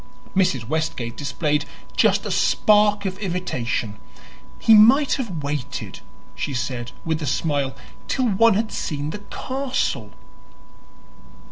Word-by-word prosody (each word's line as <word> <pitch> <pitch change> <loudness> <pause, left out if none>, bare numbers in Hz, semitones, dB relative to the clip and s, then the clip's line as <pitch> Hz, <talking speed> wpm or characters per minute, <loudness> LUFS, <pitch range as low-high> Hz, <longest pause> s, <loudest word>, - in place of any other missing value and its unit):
Mrs. 135 -12 +1
Westgate 135 -6 -2
displayed 150 0 -1 0.3
just - - +3
a - - -2
spark 210 -1 +3
of 190 0 -3
irritation. 130 - -3 0.6
"He 225 - +5
might 250 +7 +6
have 190 - -3
waited," 140 -2 -4 0.3
she 140 - -4
said 120 -1 -3
with 160 -1 -1
a 150 - -3
smile, 140 -1 0 0.3
"till 260 - 0
one 225 +1 +4
had 215 +1 -1
seen 145 0 -3
the 210 - -6
castle." 250 - -3
160 Hz, 120 wpm, -22 LUFS, 140-210 Hz, 0.6 s, might